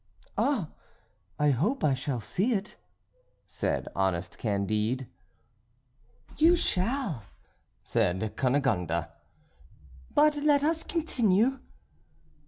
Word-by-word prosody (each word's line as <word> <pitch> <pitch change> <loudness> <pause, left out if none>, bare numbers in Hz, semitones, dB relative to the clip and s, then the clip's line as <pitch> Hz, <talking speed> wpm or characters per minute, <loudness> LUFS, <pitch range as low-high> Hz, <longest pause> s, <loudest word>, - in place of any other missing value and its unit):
"Ah! 220 - 0 0.7
I 150 -1 +3
hope 205 - 0
I 145 - +4
shall 130 -1 -2
see 195 - 0
it," 205 -1 -3 0.7
said - - -2
honest 95 -2 -1
Candide. 110 +4 -1 1.3
"You 330 +3 +6
shall," 205 - 0 0.6
said 95 +5 0
Cunegonde, 110 - +1 1.1
"but 300 0 +5
let 290 -1 +3
us 325 +1 +1
continue." 255 - +1
155 Hz, 85 wpm, -28 LUFS, -, 1.3 s, You